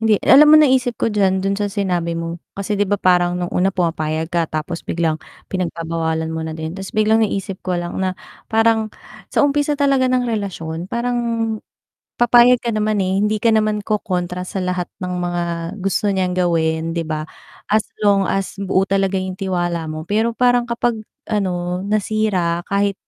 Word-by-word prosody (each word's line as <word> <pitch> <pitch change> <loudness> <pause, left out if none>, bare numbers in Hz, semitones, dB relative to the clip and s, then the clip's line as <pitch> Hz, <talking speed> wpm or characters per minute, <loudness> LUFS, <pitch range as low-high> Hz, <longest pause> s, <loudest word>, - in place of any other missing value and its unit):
hindi, 220 -2 +3
alam 295 +3 +8
mo 310 - +9
naisip 260 -5 +3
ko - - +1
diyan, 190 -2 +2
do'n 195 0 +1
sa 205 0 -1
sinabi 180 -5 -1
mo. 165 0 -5 0.2
Kasi, 200 +1 -2
'di 205 - +2
ba, 205 - +2
parang 180 -1 +3
no'ng 175 -1 -3
una 185 +2 +2
pumapayag 160 -3 -1
ka, 170 -2 +1
tapos 155 +2 -3
biglang 160 -2 -1 0.3
pinagbabawalan 165 -2 -2
mo 160 - -3
na 160 - -4
din. 160 0 -5
Tapos 195 -1 -7
biglang 215 +1 +3
naisip 195 -3 -2
ko 180 -1 -1
lang 175 0 -4
na, 185 -1 -1 0.3
parang, 225 -1 +3 0.4
sa - - +3
umpisa 290 +1 +1
talaga 275 -2 +3
ng 250 -1 +2
relasyon, 180 -5 -4
parang, 245 +1 -1 1.0
papayag 240 +1 +6
ka 235 - -1
naman, 215 -1 +1
eh, 190 +1 0
hindi 210 +1 +1
ka 230 - +4
naman 215 -1 +1
kokontra 180 -4 -2
sa 190 - -4
lahat 180 -1 -1
ng 180 -1 -3
mga 175 -1 -1 0.4
gusto 195 +2 0
niyang 185 -1 0
gawin, 165 -2 +1
'di 170 - -1
ba, 155 -1 -2 0.5
as 215 0 +4 0.2
long 200 -2 +3
as, 195 -1 -1
buo 190 -1 +1
talaga 195 0 +1
'yong 185 0 -4
tiwala 175 -4 -1
mo. 155 0 -5
Pero, 225 +4 +1
parang 245 -1 +3
kapag, 235 -2 0 0.2
ano, 180 -3 -1
nasira, 200 -4 0
kahit 200 0 +1
190 Hz, 175 wpm, -19 LUFS, 175-215 Hz, 1.0 s, mo